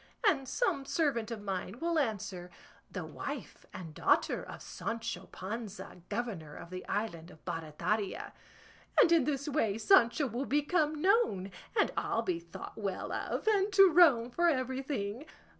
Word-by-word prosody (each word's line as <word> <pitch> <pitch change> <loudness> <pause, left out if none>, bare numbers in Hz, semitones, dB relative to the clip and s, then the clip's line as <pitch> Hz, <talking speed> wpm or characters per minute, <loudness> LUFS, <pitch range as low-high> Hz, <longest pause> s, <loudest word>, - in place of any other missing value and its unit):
and 275 -9 +2
some 380 - 0
servant 270 -7 0
of 225 -3 -5
mine 195 +1 -3
will 335 0 +1
answer, 200 -8 -2 0.4
"The - - -5
wife - - -7
and 165 -4 -8
daughter - - +2
of - - -9
Sancho 230 -5 -4
Panza, 195 -2 -7
governor 200 -9 -4
of 170 - -10
the 185 0 -5
island 180 -6 -3
of 155 - -17
Barataria;" 175 +5 -2 0.7
and 335 - +7
in 330 -6 +5
this 280 -1 -1
way 230 -9 +1
Sancho 260 - +5
will 250 +2 -2
become 300 +1 +1
known, 370 - +3 0.3
and - - +3
I'll 230 - 0
be 180 -6 -1
thought 170 0 -9
well 195 -3 -3
of, - - -3
and 415 -1 +3
"to 390 -1 +8
Rome 280 -9 +6
for 345 +6 +2
everything." 260 -3 -2
230 Hz, 150 wpm, -32 LUFS, 195-300 Hz, 0.7 s, to